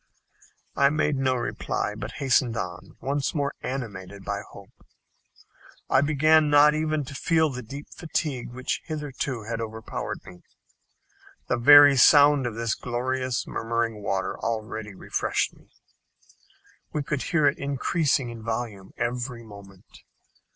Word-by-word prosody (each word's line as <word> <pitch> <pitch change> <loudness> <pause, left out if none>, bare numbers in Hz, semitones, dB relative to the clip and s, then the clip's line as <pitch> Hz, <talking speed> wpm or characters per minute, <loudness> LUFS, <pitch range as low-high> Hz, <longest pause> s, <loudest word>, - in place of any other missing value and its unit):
I 140 0 +4
made 150 0 +1
no 130 -1 +1
reply, 120 -3 -2
but 105 0 -7
hastened 130 -5 +1
on, 90 -1 -6
once 140 +3 -1
more 145 -1 -1
animated 100 -7 -6
by 100 0 -3
hope. 100 -1 -14 1.2
I 130 - +5
began 155 +1 +4
not 145 +1 +6
even 155 -1 -1
to 135 - -9
feel 160 +1 +1
the 125 -1 -5
deep 140 +5 -8
fatigue 150 -7 -3
which 130 +2 -3
hitherto 140 -6 -4
had 115 +1 -4
overpowered 110 0 -6
me. 90 -2 -13 1.1
The - - +2
very 145 +3 +8
sound 145 0 +6
of 115 - -5
this 115 -1 -1
glorious 130 +1 -2
murmuring 115 -1 -2
water 95 -1 -2
already 110 -2 -4
refreshed - - -1
me. - - -23 1.2
We 150 - -2
could 140 -1 -2
hear 155 -4 +1
it 140 - +2
increasing 140 -2 0
in 115 -1 -9
volume 110 -4 -5
every 120 0 -3
moment. 100 -3 -14
125 Hz, 135 wpm, -25 LUFS, 110-145 Hz, 1.2 s, very